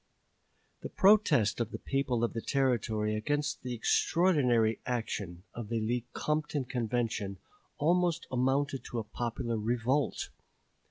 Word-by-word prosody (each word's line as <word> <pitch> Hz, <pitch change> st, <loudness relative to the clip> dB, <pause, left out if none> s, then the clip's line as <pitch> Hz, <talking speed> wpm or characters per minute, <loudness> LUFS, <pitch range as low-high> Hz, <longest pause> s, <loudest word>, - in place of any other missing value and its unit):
The -, -, -5 dB
protest 190 Hz, -, +4 dB
of 115 Hz, -2 st, -1 dB
the -, -, -5 dB
people 130 Hz, -4 st, -1 dB
of 120 Hz, -, 0 dB
the 115 Hz, -, -3 dB
Territory 110 Hz, -6 st, 0 dB
against 145 Hz, +7 st, -1 dB
the 125 Hz, -1 st, -4 dB
extraordinary 125 Hz, -4 st, +2 dB
action 100 Hz, -7 st, -3 dB
of 120 Hz, -3 st, -6 dB
the 115 Hz, -1 st, 0 dB
Lecompton 130 Hz, +6 st, -2 dB
Convention 115 Hz, -5 st, -2 dB, 0.4 s
almost 170 Hz, +1 st, +2 dB
amounted 135 Hz, +2 st, +1 dB
to 120 Hz, -, -5 dB
a 115 Hz, -, -1 dB
popular 115 Hz, +1 st, -3 dB
revolt. 120 Hz, +6 st, 0 dB
120 Hz, 120 wpm, -31 LUFS, 115-145 Hz, 0.4 s, protest